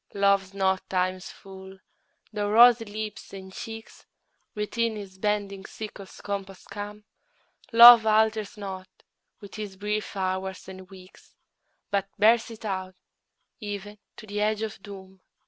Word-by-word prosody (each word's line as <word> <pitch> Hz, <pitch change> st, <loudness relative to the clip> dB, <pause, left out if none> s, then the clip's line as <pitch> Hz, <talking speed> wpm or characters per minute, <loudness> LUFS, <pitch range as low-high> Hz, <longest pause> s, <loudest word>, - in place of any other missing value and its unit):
Love's 200 Hz, -1 st, +2 dB
not 190 Hz, -1 st, 0 dB
Time's 185 Hz, 0 st, -1 dB
fool, 190 Hz, 0 st, -12 dB, 0.6 s
though 205 Hz, -1 st, -2 dB
rosy 235 Hz, +1 st, +6 dB
lips 210 Hz, -1 st, -7 dB
and 190 Hz, -1 st, -10 dB
cheeks 225 Hz, +2 st, -9 dB, 0.5 s
Within 220 Hz, +2 st, -1 dB
his 195 Hz, -2 st, -10 dB
bending 200 Hz, -1 st, -2 dB
sickle's 200 Hz, -2 st, -9 dB
compass 195 Hz, -2 st, -6 dB
come: 205 Hz, +1 st, -8 dB, 0.7 s
Love 235 Hz, -1 st, +10 dB
alters 215 Hz, -1 st, +2 dB
not 190 Hz, -2 st, -7 dB, 0.5 s
with 200 Hz, -1 st, -12 dB
his 210 Hz, -3 st, -7 dB
brief 210 Hz, +2 st, -3 dB
hours 190 Hz, 0 st, -3 dB
and 190 Hz, -1 st, -11 dB
weeks, 185 Hz, -1 st, -16 dB, 0.6 s
But 195 Hz, -1 st, -1 dB
bears 225 Hz, +3 st, +4 dB
it 225 Hz, -1 st, -11 dB
out 185 Hz, -2 st, -4 dB, 0.6 s
even 205 Hz, -1 st, -7 dB, 0.2 s
to -, -, -11 dB
the 210 Hz, 0 st, -4 dB
edge 215 Hz, +1 st, 0 dB
of 215 Hz, -3 st, -6 dB
doom. 190 Hz, -2 st, -12 dB
205 Hz, 130 wpm, -26 LUFS, 190-215 Hz, 0.7 s, Love